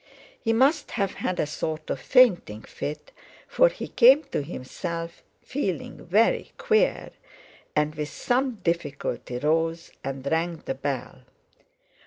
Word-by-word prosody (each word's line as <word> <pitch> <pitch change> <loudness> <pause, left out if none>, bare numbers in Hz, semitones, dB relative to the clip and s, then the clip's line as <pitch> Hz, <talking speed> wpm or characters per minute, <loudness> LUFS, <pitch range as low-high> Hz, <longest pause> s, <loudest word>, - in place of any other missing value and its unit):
He 225 - +1
must 275 +6 +3
have 195 -3 0
had 185 - -3
a - - +2
sort 155 +1 -4
of - - -3
fainting 180 - +4
fit, 150 +1 -6 0.4
for - - +5
he - - -7
came 265 +5 +6
to - - 0
himself 165 +4 -6 0.2
feeling 190 - -4
very 210 +6 +2
queer; 455 +3 +1 0.6
and 150 0 +2
with 150 -1 -4
some 255 0 0
difficulty 140 -7 -2
rose 165 +4 0
and 135 0 -5
rang 165 0 -1
the 270 - -1
bell. - - -4
170 Hz, 130 wpm, -26 LUFS, 150-245 Hz, 0.6 s, came